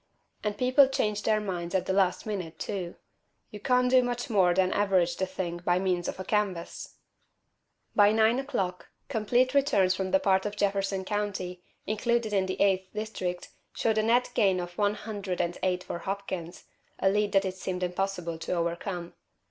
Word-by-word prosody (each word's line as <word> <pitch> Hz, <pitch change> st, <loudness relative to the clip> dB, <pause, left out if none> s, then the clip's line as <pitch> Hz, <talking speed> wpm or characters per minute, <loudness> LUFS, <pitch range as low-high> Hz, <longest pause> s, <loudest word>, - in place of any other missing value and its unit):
And 210 Hz, -1 st, -2 dB
people 255 Hz, +3 st, +5 dB
change 210 Hz, -5 st, -1 dB
their 215 Hz, 0 st, +2 dB
minds 180 Hz, -3 st, -4 dB
at 190 Hz, -, +1 dB
the 190 Hz, -, 0 dB
last 190 Hz, -2 st, +2 dB
minute, 180 Hz, -7 st, -4 dB
too. 180 Hz, -3 st, -4 dB, 0.6 s
You 210 Hz, -, -8 dB
can't 250 Hz, +2 st, +2 dB
do 255 Hz, 0 st, +7 dB
much 245 Hz, -1 st, -3 dB
more 190 Hz, -4 st, +4 dB
than 185 Hz, +1 st, +2 dB
average 190 Hz, -4 st, +2 dB
the 190 Hz, -, -1 dB
thing 180 Hz, -2 st, -4 dB
by 175 Hz, 0 st, +1 dB
means 180 Hz, -2 st, 0 dB
of -, -, -5 dB
a -, -, -3 dB
canvass." 190 Hz, -4 st, -2 dB, 1.0 s
By 205 Hz, 0 st, +6 dB
nine 220 Hz, +3 st, +3 dB
o'clock, 190 Hz, -10 st, -3 dB, 0.2 s
complete 245 Hz, +2 st, +2 dB
returns 270 Hz, -10 st, +3 dB
from 190 Hz, 0 st, -2 dB
the 285 Hz, -, +4 dB
part 190 Hz, -5 st, +2 dB
of 205 Hz, -, -5 dB
Jefferson 195 Hz, -1 st, 0 dB
County 190 Hz, -3 st, -3 dB, 0.2 s
included 235 Hz, 0 st, 0 dB
in 190 Hz, -2 st, +2 dB
the 185 Hz, -, -4 dB
Eighth 190 Hz, -1 st, +2 dB
District 195 Hz, -5 st, -4 dB, 0.3 s
showed 220 Hz, -1 st, +1 dB
a -, -, +4 dB
net 240 Hz, +3 st, +2 dB
gain 195 Hz, -6 st, +3 dB
of 175 Hz, 0 st, -6 dB
one 205 Hz, +1 st, +1 dB
hundred 205 Hz, -5 st, -5 dB
and 175 Hz, 0 st, 0 dB
eight 180 Hz, -1 st, 0 dB
for 170 Hz, -, -5 dB
Hopkins 185 Hz, -2 st, -5 dB, 0.3 s
a -, -, +1 dB
lead 205 Hz, +1 st, +2 dB
that 195 Hz, 0 st, +4 dB
it 185 Hz, 0 st, -3 dB
seemed 185 Hz, -1 st, -3 dB
impossible 180 Hz, -2 st, -2 dB
to 165 Hz, -, -3 dB
overcome. 170 Hz, +1 st, -3 dB
195 Hz, 180 wpm, -28 LUFS, 180-215 Hz, 1.0 s, do